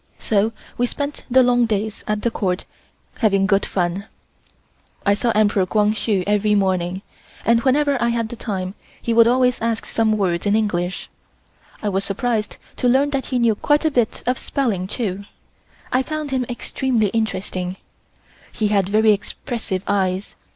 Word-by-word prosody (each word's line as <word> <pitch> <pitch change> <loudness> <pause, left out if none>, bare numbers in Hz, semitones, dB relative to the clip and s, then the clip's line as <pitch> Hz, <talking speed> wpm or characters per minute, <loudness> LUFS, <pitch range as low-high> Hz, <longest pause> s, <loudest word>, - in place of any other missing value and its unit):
So 215 +1 +1 0.3
we 245 - +3
spent 285 +3 -4
the 260 +1 +6
long 245 -1 +3
days 215 0 -2
at 210 0 -1
the 235 - +1
Court 185 -4 -1 0.5
having 195 -4 +3
good 200 0 +2
fun. 185 +2 -1 1.0
I 200 - +5
saw 220 +4 0
Emperor 205 -3 +3
Kwang 210 +1 +2
Hsu 210 -3 0
every 210 0 +2
morning, 190 -1 0 0.4
and 230 0 +4
whenever 275 +1 +2
I 235 - +2
had 230 -1 -1
the 240 - -6
time 190 -5 -4 0.3
he 235 - -1
would 230 0 +6
always 250 0 +2
ask 230 -1 -1
some 220 -1 +1
words 180 -2 0
in 205 - +3
English. 185 -4 -1 0.8
I 210 - +1
was 195 0 0
surprised 215 +2 -1 0.2
to 250 - +1
learn 270 +4 +3
that 275 -2 -2
he 255 - -1
knew 235 -2 +3
quite 295 +8 +1
a 315 - +3
bit 240 -5 0
of 250 +1 0
spelling, 215 -10 -1
too. 200 -3 -3 0.7
I 255 - +3
found 305 +1 -4
him 255 -2 0
extremely 240 -2 0
interesting. 185 -4 -2 0.7
He 215 -2 -1
had 200 -2 +2
very 215 +1 +4
expressive 205 -1 -3
eyes. 190 -1 0
215 Hz, 165 wpm, -21 LUFS, 195-245 Hz, 1.0 s, the